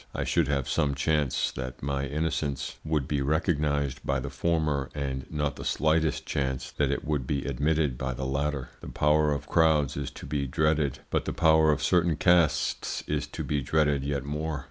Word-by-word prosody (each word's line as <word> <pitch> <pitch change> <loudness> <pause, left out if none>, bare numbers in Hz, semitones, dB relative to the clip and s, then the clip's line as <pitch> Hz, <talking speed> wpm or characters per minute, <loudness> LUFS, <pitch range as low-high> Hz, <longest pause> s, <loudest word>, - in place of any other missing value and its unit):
I - - -1
should 85 -5 +1
have 70 -3 0
some 70 -2 +1
chance 75 -1 +1
that 65 0 -7
my 70 0 -1
innocence 70 -2 -2
would 75 -4 -1
be 70 -2 0
recognised 75 -2 0
by 70 0 0
the 65 +2 -5
former 75 -2 0
and 65 -2 -3
not 75 -2 -2
the - - -7
slightest 80 0 +1
chance 65 -2 -2
that - - 0
it - - -2
would 75 -5 -1
be 70 -2 -1
admitted 70 -1 0
by 65 -1 -2
the 65 - -4
latter. 70 -1 -2
The - - -8
power 75 0 +3
of 70 0 -2
crowds 75 -3 +3
is 70 -2 -3
to - - -11
be 70 0 -2
dreaded, 75 0 +1
but - - 0
the - - -2
power 80 -1 +5
of 75 -1 -1
certain 85 0 +3
castes 85 -1 +2
is 75 -1 -2
to - - -6
be 75 -1 -1
dreaded 75 0 +1
yet 70 -1 -2
more. 75 +1 -3
75 Hz, 190 wpm, -28 LUFS, 70-80 Hz, -, power